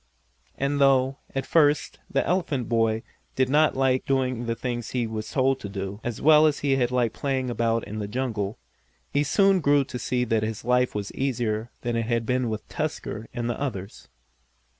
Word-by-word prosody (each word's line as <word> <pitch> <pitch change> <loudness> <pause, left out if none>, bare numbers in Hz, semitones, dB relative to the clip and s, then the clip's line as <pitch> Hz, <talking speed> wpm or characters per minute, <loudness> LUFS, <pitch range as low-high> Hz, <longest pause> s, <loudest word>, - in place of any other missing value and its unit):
And 140 +1 0
though, 135 0 +3 0.2
at 135 - -1
first, 150 -2 +2
the 135 - +1
elephant 160 -9 0
boy 115 -1 +1 0.3
did 130 -1 +2
not 150 0 +3
like 130 -1 +2
doing 130 -3 0
the 115 - 0
things 120 -1 -4
he 125 -2 -1
was 110 -1 -5
told 135 -2 +1
to 100 - -6
do, 100 0 -5
as 120 -3 -4
well 155 +1 +6
as 150 - -1
he 140 -2 +2
had 125 -2 +1
liked 125 -3 +1
playing 130 -3 -1
about 115 -1 0
in 105 +1 -5
the 105 - -3
jungle, 110 -3 -2 0.6
he 145 - +3
soon 195 +6 +4
grew 145 -3 +3
to 125 -2 -7
see 125 0 0
that 115 -2 +1
his 110 0 -4
life 125 -1 +2
was 100 -1 -4
easier 115 -4 -1
than 120 -1 -2
it 115 -1 -1
had 115 -1 0
been 125 0 0
with 110 -1 -5
Tusker 150 -7 -4
and 120 -1 -3
the 120 +3 -3
others. 100 -8 -5
125 Hz, 195 wpm, -25 LUFS, 115-135 Hz, 0.6 s, well